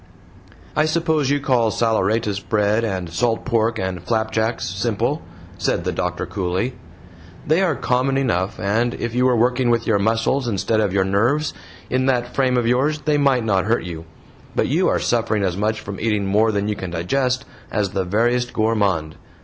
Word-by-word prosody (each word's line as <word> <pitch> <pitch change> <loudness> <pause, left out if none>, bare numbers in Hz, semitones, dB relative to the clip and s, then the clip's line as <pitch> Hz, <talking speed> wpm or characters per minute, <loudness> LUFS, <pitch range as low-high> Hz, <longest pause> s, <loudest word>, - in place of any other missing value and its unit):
"I 155 - +3
suppose 155 -3 +1
you 145 0 +2
call 125 -5 +2
saleratus 110 -2 +1
bread 105 +2 +1
and 95 -5 -2
salt 115 +6 0
pork 115 0 +1
and 95 -3 -3
flapjacks 110 +2 -1
SIMPLE?" 115 - -1 0.4
said - - 0
the - - -1
doctor, - - -2
coolly; 95 +7 -2 0.7
"they 160 +5 +3
are 175 -6 +2
COMMON 130 +2 0
enough, 110 -6 0
and 115 +5 0
if 115 -1 -4
you 125 +1 +3
were 125 - +3
working 125 +2 +2
with 115 0 +1
your 105 -3 +2
muscles 115 +5 +1
instead 110 +1 0
of 105 -3 +1
your 95 0 +2
nerves 120 +11 +1 0.3
in 130 +1 0
that 125 -2 0
frame 130 -2 +2
of 120 - +1
yours 140 +6 +1
they 150 -2 +1
might 135 -5 +2
not 95 -3 +1
hurt 115 -2 +1
you; 85 -2 -7 0.5
but - - +2
you - - +2
are - - +2
suffering 110 -3 0
as 90 -2 0
much 105 +2 -1
from 100 -2 -7
eating 105 -2 0
more 105 +3 +3
than 100 -1 -1
you 105 - -1
can 95 -2 -5
digest 125 +10 -1 0.2
as 100 -3 -1
the 95 -2 -1
veriest 120 +6 0
gourmand. 100 -8 0
115 Hz, 180 wpm, -21 LUFS, 100-125 Hz, 0.7 s, I